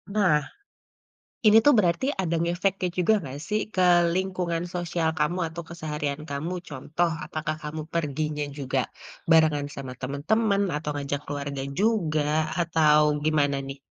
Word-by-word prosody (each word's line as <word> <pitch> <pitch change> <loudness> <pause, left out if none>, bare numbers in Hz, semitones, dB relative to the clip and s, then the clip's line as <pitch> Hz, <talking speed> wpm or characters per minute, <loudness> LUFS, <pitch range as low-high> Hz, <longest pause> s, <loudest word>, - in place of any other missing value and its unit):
Nah, 185 -8 +4 1.1
ini 215 - +8
tuh 290 - +7
berarti 175 +5 +2
ada 170 -3 0
ngefeknya 180 +2 0
juga 180 +4 +4
gak 135 0 -6
sih 210 0 +1
ke 185 - +1 0.3
lingkungan 180 -2 -1
sosial 170 -2 -1
kamu 150 +4 +1
atau 165 +1 -7
keseharian 150 -3 -4
kamu, 150 +5 -3 0.2
contoh 155 +5 -1 0.2
apakah 155 0 -3
kamu 150 +1 -5
perginya 150 -2 -1
juga 135 -1 0 0.5
barengan 155 -3 +5
sama 135 -2 -7
teman-teman 200 - +1
atau 150 0 -3
ngajak 145 -1 -3
keluarga 140 -1 -4 0.2
juga, 185 -9 +2 0.4
atau 160 -3 +4 0.2
gimana 145 -2 +2
nih 135 0 -7
155 Hz, 135 wpm, -26 LUFS, 145-175 Hz, 1.1 s, ini